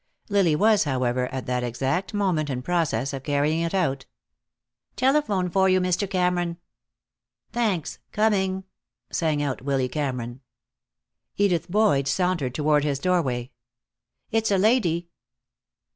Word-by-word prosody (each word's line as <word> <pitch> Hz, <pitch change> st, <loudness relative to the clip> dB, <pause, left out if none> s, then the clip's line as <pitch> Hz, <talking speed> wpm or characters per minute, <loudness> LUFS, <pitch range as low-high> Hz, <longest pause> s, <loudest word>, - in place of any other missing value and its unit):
Lily 195 Hz, -6 st, +3 dB
was, 210 Hz, +1 st, +4 dB
however, 125 Hz, -2 st, 0 dB
at 130 Hz, -2 st, -4 dB
that 125 Hz, 0 st, -1 dB
exact 135 Hz, +10 st, -1 dB
moment 185 Hz, -8 st, 0 dB
in 125 Hz, -2 st, -3 dB
process 145 Hz, -6 st, 0 dB
of 135 Hz, -, -4 dB
carrying 145 Hz, +3 st, +1 dB
it 170 Hz, +3 st, -1 dB
out. 135 Hz, -8 st, 0 dB, 0.9 s
"Telephone 255 Hz, -9 st, +2 dB
for 190 Hz, +2 st, +2 dB
you, 185 Hz, 0 st, +4 dB
Mr. 185 Hz, +2 st, 0 dB
Cameron." 180 Hz, -2 st, 0 dB, 0.9 s
"Thanks. 210 Hz, -9 st, -1 dB
Coming," 190 Hz, -3 st, +1 dB, 0.5 s
sang 155 Hz, -3 st, 0 dB
out 135 Hz, -3 st, -2 dB
Willy 135 Hz, -1 st, 0 dB
Cameron. 125 Hz, -3 st, -4 dB, 1.0 s
Edith 180 Hz, -4 st, +1 dB
Boyd 190 Hz, -9 st, +3 dB
sauntered 170 Hz, -5 st, 0 dB
toward 150 Hz, -1 st, +2 dB
his 145 Hz, -2 st, 0 dB
doorway. 135 Hz, -7 st, 0 dB, 0.8 s
"It's 225 Hz, 0 st, +1 dB
a 200 Hz, -, +3 dB
lady." 185 Hz, -6 st, +2 dB
170 Hz, 125 wpm, -25 LUFS, 135-190 Hz, 1.0 s, was